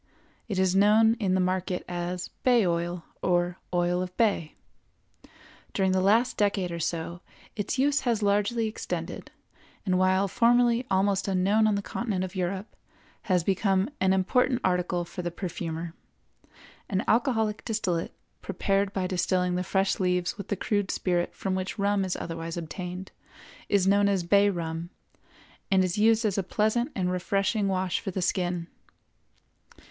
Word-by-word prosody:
It 200 -4 -3
is 190 0 +2
known 215 +3 +5
in 190 -4 +1
the - - +2
market 185 0 -1
as 175 0 -4
bay 245 -5 +4
oil 170 0 -1 0.2
or 175 0 +1
oil 175 0 +1
of 180 0 -6
bay. 200 -9 +1 1.2
During 190 -1 +2
the 185 0 +2
last 225 +6 +3
decade 200 -3 +1
or 170 - -4
so 170 +1 -3 0.3
its 205 +4 -2
use 285 +2 +3
has 230 -4 0
largely 205 +3 +1
extended, 215 - -5 0.6
and, 185 -2 +2
while 185 +1 +3
formerly 240 +2 +3
almost 195 +1 +1
unknown 195 +3 +3
on 210 - +2
the 200 - -2
continent 205 -6 -2
of 185 -1 -5
Europe, 190 +3 -3 0.5
has 180 -2 +3
become 195 - +1
an 190 0 +3
important 245 +7 +2
article 180 -1 0
for 180 - -6
the 175 - -2
perfumer. 170 -2 -5 1.0
An 195 -2 0
alcoholic 220 -3 +1
distillate, 185 -7 -2 0.3
prepared 195 0 0
by 190 -2 -1
distilling 180 0 0
the 180 - 0
fresh 190 +1 0
leaves 180 -1 0
with 200 -1 -8
the 205 - -1
crude 205 0 -1
spirit 175 -1 -1
from 195 - -2
which 185 +2 -3
rum 200 -1 +1
is 185 -1 -2
otherwise 165 0 -5
obtained, 180 +3 -6 0.6
is 200 -3 +3
known 200 +1 +4
as 195 -3 +1
bay 200 +3 +4
rum, 165 -2 -4 0.8
and 190 -1 +4
is 185 +2 -1
used 225 +1 +4
as 200 -2 +1
a - - +2
pleasant 220 - 0
and 180 -2 0
refreshing 195 +3 0
wash 185 -2 0
for - - -5
the 185 -1 -2
skin. 175 -2 -1
190 Hz, 155 wpm, -27 LUFS, 180-205 Hz, 1.2 s, known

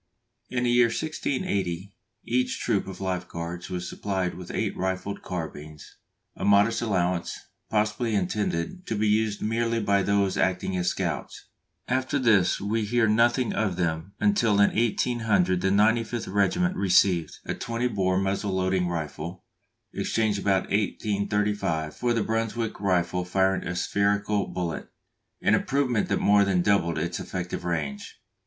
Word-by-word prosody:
In 125 -1 -1
the 120 - +2
year 120 0 +5
1680 100 - -2 0.3
each 125 +2 0
troop 100 -2 0
of 95 - -8
Life 90 -1 -2
Guards 85 +2 -6
was 90 -1 -4
supplied 95 -3 -2
with 90 -1 -9
eight - - -2
rifled 95 +2 -3
carbines, 75 -4 -7 0.4
a - - -7
modest 100 +3 +4
allowance, 90 -5 0 0.3
possibly 110 +1 0
intended 100 - -2
to 115 - -1
be 105 +1 +1
used 105 0 +1
merely 115 +1 0
by 100 -2 +2
those 100 -1 +1
acting 95 0 0
as 90 -1 -1
scouts. - - -4 0.4
After 130 +2 0
this 115 -8 +3
we 110 +3 -1
hear 115 +2 +2
nothing 120 +3 +3
of 100 -4 0
them 85 +1 -2
until 205 - +3
in 100 - +4
1800 110 -5 +1
the 95 - +1
95th 110 +1 +1
Regiment 180 - +2
received 90 -3 +2
a - - -2
20 115 +1 -2
bore 95 -4 +1
muzzle 95 +1 -1
loading 95 -1 +1
rifle, 85 +1 -5 0.5
exchanged 110 -2 0
about 95 -1 +2
1835 100 -5 -1
for 120 -1 0
the 115 - +1
Brunswick 115 0 -2
rifle 90 -2 +1
firing 95 +1 +1
a 90 - -3
spherical 100 +2 +1
bullet, 85 -3 -4 0.5
an - - +4
improvement 130 -5 +1
that - - +2
more 100 0 +4
than 95 -3 +1
doubled 85 -5 +2
its 85 +3 -2
effective 90 -1 -4
range. 75 -6 -4
100 Hz, 145 wpm, -26 LUFS, 90-110 Hz, 0.5 s, year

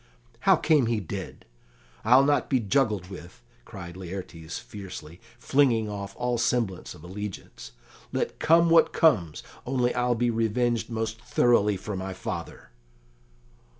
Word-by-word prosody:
"How - - +8
came 155 -6 +3
he 115 -2 0
dead? 95 - -7 0.6
I'll 125 +5 +6
not 145 +1 +1
be 130 - +3
juggled 105 -5 0
with," 85 -9 -11 0.2
cried 85 0 -9
Laertes 90 -3 -7
fiercely, 95 -5 -9 0.2
flinging 120 -6 +2
off 100 -1 -6
all 125 -1 -1
semblance 115 -6 -1
of 75 - -15
allegiance. 95 -9 -8 0.4
"Let - - -2
come 170 +1 +4
what 165 - +5
comes, 100 - +2 0.2
only 125 -1 0
I'll 125 0 +1
be 120 +1 +1
revenged 115 +1 0
most 115 0 -3
thoroughly 120 -4 +2
for 105 +1 -6
my 95 0 -4
father." 90 - -7
110 Hz, 135 wpm, -26 LUFS, 95-125 Hz, 0.6 s, How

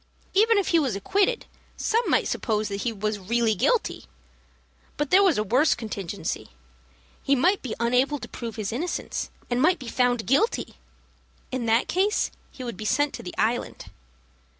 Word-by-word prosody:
Even 440 +3 +4
if 400 - +1
he 335 - +4
was 265 -9 0
acquitted, 400 - +1 0.3
some 455 +1 +1
might - - +3
suppose 215 -2 -1
that 200 0 -3
he 240 - 0
was 210 0 -2
really 225 +3 +1
guilty. 455 - 0 0.9
But 295 -2 -2
there 375 +2 +7
was 380 -6 +4
a 210 - +1
worse 255 +9 +3
contingency. 205 -6 -5 0.7
He 280 - +2
might 365 +10 +2
be 250 - -4
unable 250 +5 +2
to - - -8
prove 230 -2 -6
his 215 -2 -3
innocence, 335 +9 -3 0.2
and 245 0 0
might 360 +5 +4
be 260 -5 -9
found 245 -1 +1
guilty. 345 - +1 0.8
In 255 -2 -2
that 225 +2 +3
case 395 +4 +1 0.2
he 260 - -9
would 235 -6 -5
be 215 - -6
sent 285 +7 +1
to - - -6
the 180 - -8
Island. 235 +2 -1
250 Hz, 175 wpm, -25 LUFS, 220-335 Hz, 0.9 s, there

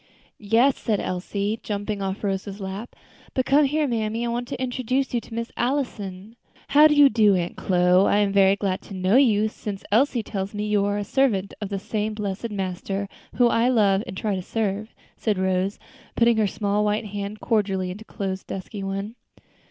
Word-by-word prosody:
"Yes," 235 +6 +3
said 215 -4 0
Elsie, 200 +4 -2
jumping 205 0 -3
off 195 +2 -3
Rose's 195 0 -3
lap; 195 +4 -6 0.4
"but 260 - +1
come 285 +2 +4
here, 300 +2 +1
mammy; 225 -1 -1
I - - -1
want 240 +1 -2
to - - -5
introduce 255 +1 -1
you 240 - +1
to 225 - -13
Miss 230 0 -4
Allison." 225 -6 -3 0.3
"How 300 +2 +7
do 300 - +2
you 290 -1 +8
do, 215 -5 +4
Aunt 175 -1 -2
Chloe? 180 +1 +3
I - - +4
am 205 -1 +2
very 195 0 +5
glad 195 -2 -2
to 200 - -10
know 185 +3 +2
you, 220 -6 +4
since 205 -2 -6
Elsie 240 +1 +3
tells 200 -1 -4
me 210 0 -2
you 210 -1 +2
are 205 0 0
a 205 - -2
servant 205 -4 +1
of 205 - -3
the 200 - -2
same 215 +2 -3
blessed 210 +2 -3
Master 195 0 -3 0.3
whom 240 -1 +4
I 235 +2 +3
love 205 -5 +3
and 190 - -7
try 210 0 -1
to 185 - -2
serve," 215 +2 -3 0.2
said 215 -3 0
Rose, 190 +1 0 0.4
putting 235 -1 +4
her 215 -2 +3
small 205 +1 0
white 210 +1 0
hand 205 +1 -5
cordially 195 -5 0
into 205 +4 -8
Chloe's 195 -4 -4
dusky 195 +2 -6
one. 195 +2 -4
210 Hz, 195 wpm, -24 LUFS, 195-230 Hz, 0.4 s, you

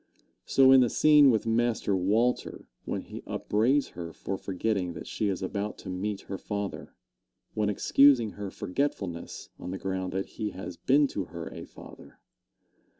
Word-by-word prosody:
So 135 -1 +6
in 135 -1 +8
the 125 - +3
scene 150 0 +6
with 110 -2 +2
Master 115 -3 +1
Walter, 110 +7 0 0.2
when - - -3
he - - -9
upbraids 125 +7 +1
her 85 -1 -7
for 95 - -5
forgetting 95 -1 -2
that 80 - -8
she 105 - -2
is 95 -2 -2
about 100 +3 -3
to 95 - -7
meet 100 +2 -3
her 95 - -7
father, 100 -1 -5 0.6
when 105 -1 0
excusing 120 +2 +4
her 100 -1 -6
forgetfulness 95 -5 -4
on 90 - -7
the 95 - -4
ground 95 -1 -3
that 95 +1 -1
he 105 - -5
has 90 -1 -6
been 140 +9 +3
to 95 - -3
her 85 -2 -7
a - - -8
father. - - -14
105 Hz, 165 wpm, -28 LUFS, 95-120 Hz, 0.6 s, in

